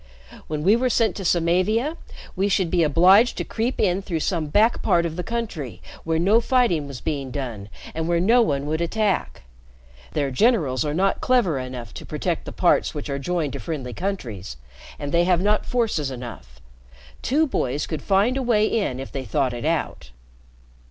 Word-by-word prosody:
When 150 -1 -3
we 200 +6 +5
were 250 +2 +1
sent 230 -2 +2
to 195 - -5
Samavia, 185 - +1 0.4
we 195 +2 +1
should 190 -3 +1
be 175 - +3
obliged 185 - +5
to - - -1
creep 235 +3 -2
in 190 -1 +2
through 170 -5 -3
some 165 -2 -1
back 215 +9 +3
part 170 0 +2
of 165 -1 -3
the 180 - -3
country 175 - -4 0.2
where 165 -1 0
no 200 +8 +4
fighting 230 - +2
was 135 -3 -7
being 140 -4 -3
done 120 -7 -5 0.2
and 160 0 -3
where 170 0 +2
no 230 +8 +4
one 140 -10 0
would 155 +2 -1
attack. 205 - -1 0.7
Their 140 -2 0
generals 155 - +2
are 150 -1 -2
not 195 +3 +1
clever 220 - +2
enough 125 -5 -7
to - - -8
protect - - -3
the - - -6
parts - - +2
which 145 -1 -5
are 140 - -2
joined 165 -1 -2
to - - -5
friendly 135 -7 -5
countries, 115 - -5 0.4
and 145 0 -5
they 170 0 +3
have 180 -2 +3
not 210 +3 +1
forces 220 - 0
enough. 115 - -9 0.6
Two 300 +5 +2
boys 145 - -1
could 155 - -4
find 205 +6 +2
a - - -1
way 225 -4 +3
in 200 - -1
if 135 - -7
they 135 - -4
thought 130 +2 0
it 120 +3 -5
out." 160 - -2
170 Hz, 190 wpm, -23 LUFS, 140-210 Hz, 0.7 s, we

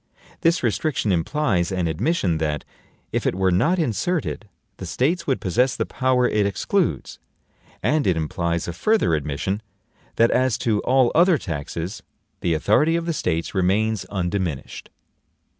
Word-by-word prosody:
This 170 -3 +2
restriction 115 - 0
implies 90 - 0
an 90 -2 -1
admission 85 - 0
that, 75 -2 -2 0.5
if - - -1
it - - 0
were 95 0 +2
not 150 - +2
inserted, 155 - -1 0.3
the 95 - -7
States 160 - 0
would 135 - +1
possess 120 +7 +1
the - - -1
power 130 -1 +1
it 105 -1 +1
excludes; 100 - -1 0.6
and 155 -1 +2
it 90 -3 +2
implies 85 +2 -2
a 85 - -3
further 215 - +2
admission, 75 +7 -2 0.5
that 115 +1 +4
as 130 -2 +2
to 110 -3 0
all 130 +1 +3
other 175 0 +5
taxes, 85 - -5 0.4
the 85 -2 0
authority 150 - +3
of 170 0 -1
the 170 - -1
States 85 - -2
remains 105 +3 +1
undiminished. 90 -6 -3
105 Hz, 145 wpm, -23 LUFS, 85-135 Hz, 0.6 s, other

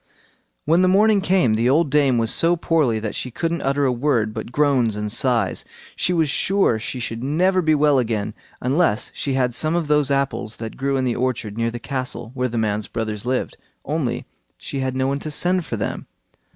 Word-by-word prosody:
When 165 +4 +4
the 185 - +4
morning 205 +2 +4
came 185 - +2
the 115 +3 +2
old 150 +1 +2
dame 140 -4 +3
was 115 -1 +3
so 170 +1 +2
poorly 160 -8 +1
that 110 -1 -4
she 125 - -4
couldn't 165 +7 -2
utter 140 +1 +1
a 130 - +2
word 120 -4 0
but 110 +1 -6
groans 135 -7 +2
and 105 0 -3
sighs. 120 +1 +1 0.3
She - - 0
was 165 -3 +2
sure 190 - +2
she 125 +3 -5
should 115 -1 -4
never 180 +7 +2
be 155 -2 +3
well 145 -2 +3
again, 110 -3 -2 0.3
unless 135 -3 +1
she 135 -2 -2
had 125 -2 +1
some 155 +7 +1
of 170 -3 -1
those 150 -2 +2
apples 140 -6 -1
that 110 -1 -6
grew 135 0 -1
in 130 - 0
the 125 -2 0
orchard 120 -4 -2
near 115 0 0
the 120 - -5
castle 125 -2 -5
where 125 -1 -1
the 115 - -4
man's 105 -1 -1
brothers 110 0 -4
lived; 130 0 -1 0.3
only - - -2 0.3
she 140 - -5
had 130 -1 -2
no 130 0 0
one 140 +1 -1
to 155 - -5
send 180 +3 0
for - - -3
them. 100 - -4
130 Hz, 210 wpm, -21 LUFS, 115-155 Hz, 0.3 s, When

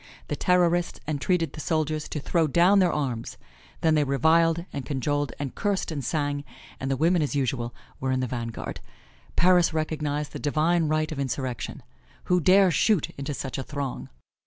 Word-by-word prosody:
The - - -1
Terrorists 175 -1 +2
entreated 155 +1 0
the - - -8
soldiers 155 -1 -1
to 150 - -3
throw 165 +3 +1
down 175 +7 +5
their 180 -2 +4
arms, 130 -6 -3 0.4
then 160 -1 +3
they 150 -1 +3
reviled 165 +5 +3
and 140 - -4
cajoled 145 0 -1
and 140 -3 -4
cursed 200 -4 -1
and 145 -4 -3
sang, 145 -1 -1 0.4
and 135 - -3
the 135 - 0
women 170 +4 +3
as 145 -1 -1
usual 125 -3 -1 0.2
were 130 0 -1
in 130 - +1
the 130 - 0
vanguard. 115 -2 -5 0.6
Paris 175 -2 +4
recognized 150 -2 -2
the - - -5
divine 160 +3 +2
right 155 0 0
of 150 - -5
insurrection. 130 -2 -3 0.4
Who 180 0 +2
dare 190 +2 +5
shoot 200 0 +2
into 140 +1 -5
such 135 0 -4
a - - -3
throng! 140 -2 -5
150 Hz, 175 wpm, -26 LUFS, 140-170 Hz, 0.6 s, down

